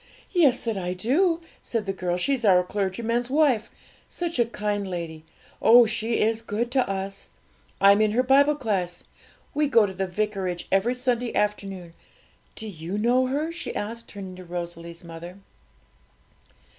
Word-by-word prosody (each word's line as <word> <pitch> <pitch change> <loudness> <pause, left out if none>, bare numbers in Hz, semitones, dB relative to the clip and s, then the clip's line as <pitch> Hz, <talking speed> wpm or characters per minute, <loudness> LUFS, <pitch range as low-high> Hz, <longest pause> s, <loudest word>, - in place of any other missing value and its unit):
'Yes, 295 -9 +3
that 225 -4 -2
I 180 0 -3
do,' 325 - +2 0.2
said 230 -3 -2
the 195 - -2
girl. 180 -2 -2
'She's 260 +6 0
our 185 -4 +5
clergyman's 220 +6 -1
wife 270 -6 +2 0.4
such 340 -6 -3
a 240 - +5
kind 210 -3 -2
lady 165 -3 -5 0.4
oh, 240 +1 +8
she 225 +1 -1
is 225 +1 +1
good 230 +2 -2
to 260 -5 +1
us! 195 0 -4 0.5
I'm 200 +1 +6
in 215 -1 +2
her 250 +3 +3
Bible 280 +3 +5
class; 190 -10 -2 0.5
we 300 0 +2
go 230 -6 +5
to 190 - -5
the 190 0 -2
vicarage 190 -2 -2
every 205 +6 +2
Sunday 250 -1 -1
afternoon. 195 -4 -2 0.6
Do 220 - -7
you 175 0 -5
know 245 +4 +3
her?' 295 +5 -1
she 340 - -6
asked, 230 +3 -4
turning 190 -2 -8
to 185 - -9
Rosalie's 170 -1 -7
mother. 170 +2 -9
210 Hz, 155 wpm, -25 LUFS, 185-245 Hz, 0.6 s, oh